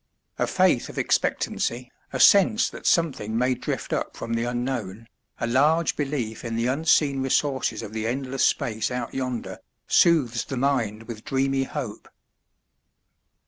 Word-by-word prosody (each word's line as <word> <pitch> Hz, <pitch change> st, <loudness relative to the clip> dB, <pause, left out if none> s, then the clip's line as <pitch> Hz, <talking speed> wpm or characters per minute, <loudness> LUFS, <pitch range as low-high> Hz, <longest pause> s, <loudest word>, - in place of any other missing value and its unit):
A -, -, +1 dB
faith -, -, +2 dB
of -, -, -10 dB
expectancy, 125 Hz, +1 st, -1 dB, 0.2 s
a 130 Hz, -, -3 dB
sense 210 Hz, -, +5 dB
that -, -, -6 dB
something 130 Hz, -10 st, +1 dB
may 125 Hz, +2 st, +2 dB
drift -, -, -4 dB
up -, -, -3 dB
from 115 Hz, 0 st, -4 dB
the 115 Hz, +1 st, 0 dB
unknown, 120 Hz, -4 st, -3 dB, 0.3 s
a -, -, -1 dB
large 150 Hz, +7 st, +2 dB
belief 135 Hz, -7 st, -3 dB
in 115 Hz, -1 st, -4 dB
the 115 Hz, +1 st, 0 dB
unseen 140 Hz, 0 st, +2 dB
resources 135 Hz, +1 st, 0 dB
of 105 Hz, -, -8 dB
the 110 Hz, 0 st, -2 dB
endless 130 Hz, +2 st, -2 dB
space 110 Hz, -1 st, +1 dB
out 125 Hz, -2 st, -4 dB
yonder, 125 Hz, -3 st, -4 dB, 0.3 s
soothes 135 Hz, -9 st, +3 dB
the 135 Hz, -, -5 dB
mind 120 Hz, -5 st, 0 dB
with 110 Hz, -1 st, -9 dB
dreamy 135 Hz, 0 st, 0 dB
hope. 130 Hz, -7 st, -6 dB
125 Hz, 145 wpm, -25 LUFS, 115-140 Hz, 0.3 s, sense